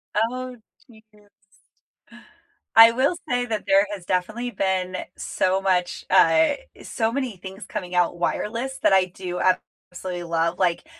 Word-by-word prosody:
Oh, 250 +3 -1 0.3
Jesus. 210 -3 -24 1.1
I 225 0 +10
will 265 +8 +1
say 245 0 0
that 220 -3 -4
there 195 +1 +4
has 185 -3 -8
definitely 215 +8 -2
been 185 -2 -1 0.2
so 190 +1 0
much, 180 -2 0
uh 165 -4 +5 0.3
so 225 -1 -1
many 250 -6 -3
things 190 +2 -9
coming 180 -4 -6
out 175 0 +2
wireless 235 +9 -2
that - - +4
I 190 -1 +5
do 180 -1 -6 0.5
absolutely 180 -1 -6
love, 170 +1 -1
like, 175 -2 +1
195 Hz, 135 wpm, -23 LUFS, 180-225 Hz, 1.1 s, I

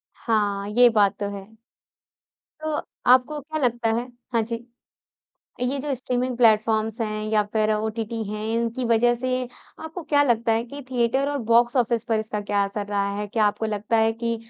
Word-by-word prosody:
हाँ। 205 -3 0
ये 240 +3 +6
बात 210 -3 +2
तो 205 -1 -2
है। 195 - -9 1.2
तो 310 -1 -1 0.4
आपको 260 +4 +4
क्या 310 +3 -5
लगता 240 -2 +1
है 240 +2 -2 0.3
हाँ, 230 - +3
जी। 230 +1 -5 1.0
ये 250 +3 0
जो 285 +1 -2
स्ट्रीमिंग 250 0 -2
प्लेटफ़ॉर्म्स 220 -1 +3
हैं 215 -1 -2
या 215 -1 +3
फिर 215 -1 +2
ओटीटी 220 +1 -2
हैं, 210 0 -4
इनकी 235 +2 -1
वज़ह 235 +1 +3
से 250 +2 -4 0.5
आपको 320 +3 -7
क्या 285 0 +6
लगता 235 -4 +2
है 225 +1 0
कि 280 +4 -9
थिएटर 255 +3 +1
और 290 - -2
बॉक्स 235 +2 +4
ऑफ़िस 235 -2 +1
पर 225 -1 0
इसका 215 -1 -4
क्या 205 0 0
असर 200 +1 -4
रहा 200 -1 0
है? 210 - -3
क्या 215 +1 +1
आपको 210 +2 0
लगता 215 +1 -1
है 225 0 +3
कि 230 +1 -2
230 Hz, 180 wpm, -24 LUFS, 215-245 Hz, 1.2 s, ये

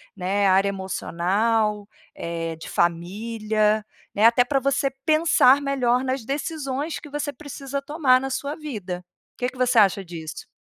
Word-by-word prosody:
né, 195 +1 +1
área 190 +1 +4
emocional, 200 +3 0 0.3
eh, 165 -1 -4
de 160 - -9
família, 210 +5 0 0.3
né? 210 - +4
Até 235 +2 +6
pra 270 +2 0
você 275 +1 0
pensar 310 -4 +5
melhor 260 -3 +1
nas 260 -2 -2
decisões 285 +1 -3
que 295 - -12
você 295 0 -3
precisa 280 0 -6
tomar 280 -4 +3
na 270 +1 -4
sua 280 +3 -3
vida. 205 - -6 0.3
Que 250 - -1
que 255 - -16
você 255 -1 +2
acha 195 -1 +4
disso? 165 -3 -8
235 Hz, 145 wpm, -24 LUFS, 195-275 Hz, 0.3 s, Até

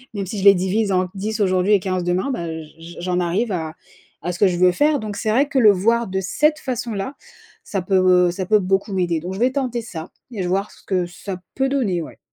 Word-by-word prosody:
même 200 -1 -2
si 200 +3 -5
je - - -4
les 200 0 +8
divise 195 +3 0
en 185 -1 +2
10 215 +3 -3
aujourd'hui 185 0 +2
et 205 - +5
15 185 -1 -2
demain, 180 +9 0
bah, 170 -10 -3 0.2
j 165 +2 -13
j'en 180 0 -1
arrive 185 +6 0
à 160 -3 -3 0.5
à 175 - -1
ce 175 - -7
que 200 - +5
je 180 -2 0
veux 180 +1 +5
faire. 295 +8 +2
Donc 215 -3 -5
c'est 220 - -2
vrai 260 +7 +3
que 280 -2 +1
le 215 -4 +7
voir 230 +5 +1
de 190 0 -2
cette 300 - +1
façon-là, 235 -4 -3 0.5
ça 195 - -3
peut, 190 +1 0 0.3
heu, - - -1
ça 185 +1 -4
peut 215 +1 +4
beaucoup 195 +2 0
m'aider 175 -3 0
donc 180 +4 -6
je 190 - -6
vais 250 +2 +3
tenter 255 -3 -2
ça 170 -7 -8 0.2
et 215 -5 -4
j 180 - -1
voir 195 +3 -1
ce - - -18
que 185 -2 0
ça 180 +2 -7 0.2
peut 270 0 +1
donner, 225 -11 0
ouais. 160 - -9
195 Hz, 255 wpm, -21 LUFS, 180-220 Hz, 0.5 s, les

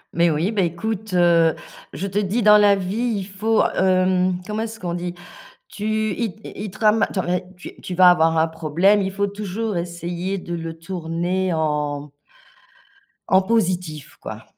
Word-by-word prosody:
Mais 170 0 +4
oui, 160 +7 0
ben 200 -4 +1
écoute, 210 +4 -4
heu, 170 -2 +4 0.4
je 170 +8 -5
te 200 +1 -1
dis, 210 +3 0
dans 210 0 +8
la 205 -1 +5
vie, 215 +5 -2
il 195 - -3
faut, 210 +3 +1
hem, 185 -1 +2
comment 215 +1 -3
est-ce 225 0 -5
qu'on 175 -2 -3
dit? 175 0 -4 0.5
Tu 215 0 -1
il 225 -6 -2
il 210 -2 -7
te - - -14
rama 215 0 +4
attends, 185 - -2
mais 180 +1 -1
tu 180 - -11
tu 180 - -6
vas 180 0 +7
avoir 165 -2 +3
un 160 - +3
problème, 165 +6 +2
il 190 - -2
faut 200 +1 -1
toujours 205 0 -4
essayer 175 +2 -4
de 175 -1 -5
le 165 -1 -6
tourner 175 +1 -2
en 150 -2 -2 1.2
en 190 0 +5
positif, 180 -8 -1
quoi. - - -8
185 Hz, 175 wpm, -21 LUFS, 170-205 Hz, 1.2 s, dans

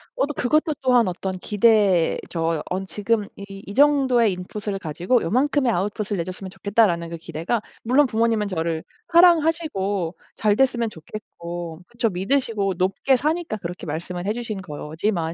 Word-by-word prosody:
어 - - +2
또 295 - -5
그것도 305 +5 +1
또한 250 -5 +4
어떤 185 +1 -3
기대죠. 185 -6 +2
언 190 +1 -2
지금 210 +1 0
이 200 - -9 0.2
"이 200 - -6
정도의 265 -6 +4
인풋을 195 +2 -5
가지고 175 +9 0
요만큼의 260 - +2
아웃풋을 205 +1 -2
내 170 - 0
줬으면 185 +2 -7
좋겠다."라는 195 -6 +1
그 170 - -5
기대가 165 +7 -3 0.2
물론 260 +5 +4
부모님은 225 -2 +1
저를 165 -3 -2 0.3
사랑하시고 310 - +3 0.2
잘 210 -1 +2
됐으면 240 -3 +2
좋겠고. 170 -2 -8
그쵸. 235 -1 -1
믿으시고 200 0 0
높게 195 +8 +2
사니까 310 -3 -1
그렇게 175 +1 -6
말씀을 175 +3 -4
해 205 - +1
주신 225 -5 -5
거지만, 160 +2 -3
205 Hz, 350 characters per minute, -23 LUFS, 175-240 Hz, 0.3 s, 또한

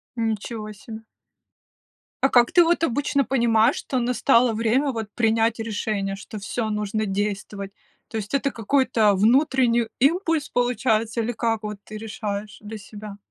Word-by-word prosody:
Ничего 220 -1 -3
себе! 220 +2 -10 1.2
А 270 - +5
как 240 -2 +4
ты 350 - +6
вот 335 0 +1
обычно 280 0 +1
понимаешь, 235 -2 +3
что 260 - -2
настало 245 0 +3
время 235 +6 +1
вот 225 -3 -4
принять 225 0 +2
решение, 210 -3 -2
что 205 +2 -9
всё 220 +2 -3
нужно 210 0 -2
действовать? 200 0 -3 0.4
То 225 - -5
есть, 205 +2 -6
это 275 0 +1
какой-то 225 -3 +2
внутренний 240 +1 +3
импульс, 320 +1 +1
получается, 235 -2 0
или 230 +2 -1
как 225 -1 -1
вот 210 -1 -5
ты 215 - -9
решаешь 210 -1 -5
для 215 +1 -7
себя? 210 0 -10
225 Hz, 145 wpm, -23 LUFS, 210-250 Hz, 1.2 s, ты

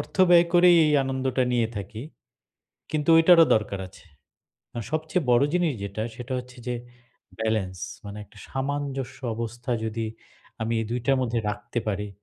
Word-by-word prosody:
অর্থ - - -8
ব্যয় 170 0 +7
করেই 175 0 +7
এই 150 - +2
আনন্দটা 130 -1 0
নিয়ে 115 -2 +2
থাকি 105 +3 -6 0.9
কিন্তু 155 +1 -1
ঐটারও 165 0 +7
দরকার 105 -2 -2
আছে। 95 - -18 0.7
আর 115 - -2
সবচেয়ে 160 +3 0
বড় 120 +2 +5
জিনিস 175 -3 +2
যেটা 100 +2 -4
সেটা 125 +2 -7
হচ্ছে 125 0 -10
যে 125 - -1 0.7
ব্যালেন্স 105 -5 -1 0.3
মানে 100 +1 -7
একটা - - -19
সামঞ্জস্য 135 -1 -3 0.2
অবস্থা 120 +3 -5
যদি 110 0 -2 0.6
আমি 115 - -1
এই - - -2
দুইটার 125 +3 +1
মধ্যে 120 -2 0
রাখতে 105 +3 -5
পারি 105 0 -2
125 Hz, 150 wpm, -25 LUFS, 110-145 Hz, 0.9 s, ব্যয়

